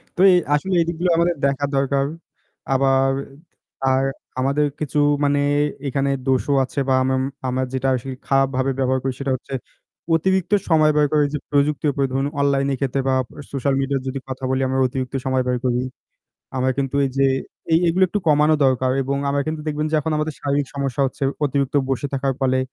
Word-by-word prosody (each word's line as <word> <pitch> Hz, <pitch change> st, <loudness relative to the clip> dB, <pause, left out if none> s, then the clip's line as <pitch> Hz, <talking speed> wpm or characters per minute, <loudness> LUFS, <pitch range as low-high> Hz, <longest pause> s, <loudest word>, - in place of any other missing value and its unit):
তো -, -, -1 dB
এ -, -, +5 dB, 0.2 s
আসলে 185 Hz, +6 st, -2 dB
এদিকগুলো 170 Hz, +2 st, -1 dB
আমাদের 170 Hz, +1 st, +2 dB
দেখা 140 Hz, +1 st, +1 dB
দরকার। 135 Hz, 0 st, +1 dB, 0.7 s
আবার, 135 Hz, 0 st, +3 dB, 0.7 s
আর 130 Hz, 0 st, +3 dB, 0.4 s
আমাদের 140 Hz, +3 st, +2 dB
কিছু 150 Hz, 0 st, -1 dB, 0.2 s
মানে 145 Hz, 0 st, +2 dB, 0.5 s
এখানে 140 Hz, +1 st, 0 dB, 0.2 s
দোষও 130 Hz, +2 st, +1 dB
আছে 130 Hz, -, -4 dB
বা -, -, +4 dB
আমাম 130 Hz, 0 st, +1 dB, 0.3 s
আমরা 130 Hz, +1 st, 0 dB
যেটা 130 Hz, 0 st, -1 dB
আসলে 130 Hz, +1 st, -5 dB
খারাপভাবে 135 Hz, -1 st, +2 dB
ব্যবহার 130 Hz, 0 st, +1 dB
করি 135 Hz, -1 st, -1 dB
সেটা 140 Hz, -1 st, -2 dB
হচ্ছে 135 Hz, +2 st, -10 dB, 0.6 s
অতিরিক্ত 190 Hz, +2 st, +1 dB, 0.2 s
সময় 155 Hz, -2 st, +5 dB
ব্যয় 150 Hz, -1 st, +3 dB
করে 150 Hz, -1 st, +4 dB
যে -, -, 0 dB
প্রযুক্তি, 145 Hz, +1 st, +1 dB
এরপরে 140 Hz, -1 st, 0 dB
ধরুন 135 Hz, +1 st, 0 dB
অনলাইনের 140 Hz, -1 st, +1 dB
ক্ষেত্রে 135 Hz, 0 st, 0 dB
বা 135 Hz, -, +2 dB, 0.4 s
সোশ্যাল 140 Hz, 0 st, 0 dB
মিডিয়ার 135 Hz, -1 st, -1 dB
যদি 135 Hz, +1 st, -3 dB
কথা 130 Hz, 0 st, -6 dB
বলি, 130 Hz, 0 st, 0 dB
আমরা 130 Hz, +1 st, 0 dB
অতিরিক্ত 130 Hz, 0 st, -4 dB
সময় 130 Hz, -1 st, +1 dB
ব্যয় 125 Hz, 0 st, 0 dB
করি। 125 Hz, -1 st, +1 dB, 0.8 s
আমার 130 Hz, 0 st, +1 dB
কিন্তু 140 Hz, 0 st, -1 dB
এই 135 Hz, -, -1 dB
যে, 135 Hz, -, +3 dB, 0.5 s
এই 160 Hz, -, +6 dB
এগুলো 180 Hz, +3 st, +2 dB
একটু 205 Hz, -, -1 dB
কমানো 150 Hz, +1 st, +4 dB
দরকার 130 Hz, -1 st, +2 dB
এবং 135 Hz, +1 st, -2 dB
আমরা 140 Hz, 0 st, +1 dB
কিন্তু 155 Hz, 0 st, -3 dB
দেখবেন 150 Hz, 0 st, -1 dB
যে -, -, -1 dB
এখন 160 Hz, +2 st, -2 dB
আমাদের 155 Hz, 0 st, -2 dB
শারীরিক 140 Hz, 0 st, 0 dB
সমস্যা 140 Hz, -1 st, -2 dB
হচ্ছে 130 Hz, -, -8 dB, 0.2 s
অতিরিক্ত 140 Hz, -1 st, -1 dB, 0.2 s
বসে 135 Hz, +2 st, -1 dB
থাকার 135 Hz, 0 st, 0 dB
ফলে, 130 Hz, -1 st, +2 dB
135 Hz, 180 wpm, -21 LUFS, 130-145 Hz, 0.8 s, এই